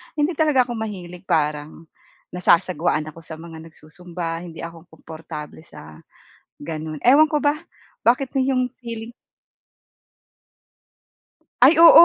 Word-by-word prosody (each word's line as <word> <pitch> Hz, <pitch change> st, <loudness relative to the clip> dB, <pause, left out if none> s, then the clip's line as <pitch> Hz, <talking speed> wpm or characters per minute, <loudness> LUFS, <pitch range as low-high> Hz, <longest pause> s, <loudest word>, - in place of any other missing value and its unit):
hindi 300 Hz, +3 st, +1 dB
talaga 300 Hz, -5 st, +4 dB
ako 240 Hz, -, -4 dB
mahilig. 180 Hz, -5 st, -6 dB
Parang 150 Hz, +1 st, -1 dB, 0.5 s
nasasagwaan 170 Hz, -3 st, +2 dB
ako 165 Hz, -, -14 dB
sa 160 Hz, -1 st, -8 dB
mga 165 Hz, -1 st, -10 dB
nagsu-zumba, 165 Hz, +1 st, -7 dB
hindi 165 Hz, -2 st, -10 dB
ako 170 Hz, 0 st, -9 dB
komportable 160 Hz, -1 st, -9 dB
sa 75 Hz, -, -13 dB, 0.6 s
gano'n. 155 Hz, 0 st, -5 dB
Ewan 290 Hz, +5 st, +7 dB
ko 300 Hz, -, +2 dB
ba 290 Hz, 0 st, +2 dB, 0.5 s
bakit 250 Hz, +3 st, +3 dB
ganun 270 Hz, -1 st, +1 dB
'yong 255 Hz, -1 st, +2 dB, 0.2 s
feeling. 230 Hz, 0 st, -7 dB, 2.5 s
Ay 270 Hz, +7 st, +8 dB
oo! 335 Hz, +1 st, +9 dB
175 Hz, 120 wpm, -22 LUFS, 160-250 Hz, 2.5 s, oo